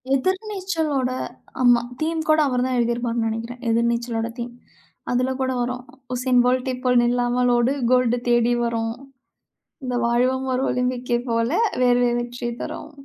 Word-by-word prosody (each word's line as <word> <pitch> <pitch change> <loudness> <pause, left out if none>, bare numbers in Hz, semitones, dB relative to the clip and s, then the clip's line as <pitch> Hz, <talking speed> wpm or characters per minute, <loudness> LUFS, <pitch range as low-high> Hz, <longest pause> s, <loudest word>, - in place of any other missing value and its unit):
எதிர்நீச்சலோட! 360 - -1 0.5
ஆமா. 245 -1 +5 0.2
தீம் 320 +1 -1
கூட, 310 0 +5
அவர்தான் 255 0 0
எழுதியிருப்பார்னு 235 -1 0
நெனைக்கிறேன். 230 +2 -5
எதிர்நீச்சலோட 235 0 0
தீம். 240 0 -5 0.6
அதுல 255 +1 +1
கூட 260 - 0
வரும். 250 +1 -3 0.3
உசேன் 250 0 +3
போல்டை 255 +1 +1
போல் 250 -1 +5
நில்லாமல் 245 +1 +2
ஓடு, 240 +3 +2 0.2
கோல்டு 250 -1 +3
தேடி 240 0 +3
வரும். 225 -1 -1 0.9
இந்த 250 - -2
வாழ்வும் 255 +2 +1
ஒரு 255 - 0
ஒலிம்பிக்கை 250 -1 0
போல, 230 +1 +1 0.3
வேர்வை 245 -1 +4
வெற்றிய 240 0 -4
தரும். - - -6
245 Hz, 130 wpm, -23 LUFS, 240-255 Hz, 0.9 s, ஆமா